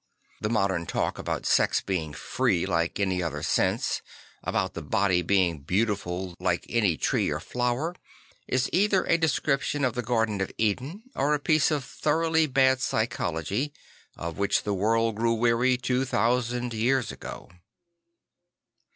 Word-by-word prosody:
The 105 - -1
modern 95 -6 0
talk - - -1
about - - -3
sex - - +3
being 85 -6 -3
free 85 +1 0
like 85 0 0
any 95 -2 +1
other 75 -4 -3
sense, - - +1 0.4
about 95 - -1
the 85 - -5
body 95 +2 +1
being 90 -3 +2
beautiful 95 +1 -1
like 90 -1 0
any 105 -9 +1
tree - - +1
or - - -2
flower, 125 +8 -2 0.5
is 130 +1 +1
either 195 0 +3
a 170 - +2
description 145 -2 +1
of 125 - 0
the 125 - -2
Garden 115 -4 0
of 95 - -2
Eden 130 - -1
or 145 +2 +2
a - - -2
piece 155 +1 +3
of 150 -4 -1
thoroughly 160 +4 +1
bad 130 -1 +3
psychology, 110 - -1 0.4
of 85 +3 -5
which 100 - +1
the 105 - -1
world 115 +3 +1
grew 115 +1 +2
weary 120 +2 +3
two 125 +1 0
thousand 120 0 0
years 120 +1 +1
ago. - - -9
115 Hz, 150 wpm, -27 LUFS, 95-130 Hz, 0.5 s, sex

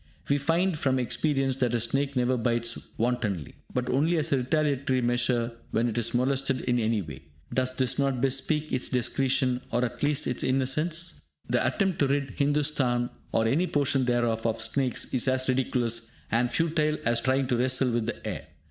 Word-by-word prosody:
We 140 0 +3
find 165 +5 +1
from 130 -3 +1
experience 135 +1 0
that 125 -2 +1
a - - +1
snake 135 +5 0
never 125 0 +2
bites 115 0 -1
wantonly, 110 - -1 0.2
but 125 -1 -2
only 155 +7 +2
as 155 - 0
a - - +3
retaliatory 135 0 0
measure 120 -1 +1 0.2
when 115 +2 +1
it 115 - -3
is 115 +1 -1
molested 135 +1 +1
in 125 -1 0
any 110 -2 0
way. 75 -4 -9 0.3
Does 130 0 0
this 130 0 0
not 135 -2 +1
bespeak 135 +4 0
its 125 - 0
discretion, 125 +1 +1
or 120 +2 +1
at 120 - -6
the 145 - +1
least 150 0 +1
its 125 - -1
innocence? 150 +7 0 0.3
The - - +1
attempt 195 -3 0
to 140 - +3
rid 140 -1 -1
Hindustan, 140 -3 +1 0.2
or 115 - +2
any 155 +11 +2
portion 140 -3 +1
thereof, 120 -2 +1
of 115 0 -1
snakes 125 +3 -1
is 130 0 +2
as 130 0 +1
ridiculous 120 -3 0 0.2
and 120 +2 +1
futile 155 -2 +1
as 115 0 +2
trying 130 +1 +1
to 125 - +2
wrestle 130 +1 +2
with 115 -1 -1
the 120 - -5
air. - - -5
130 Hz, 185 wpm, -27 LUFS, 120-140 Hz, 0.3 s, We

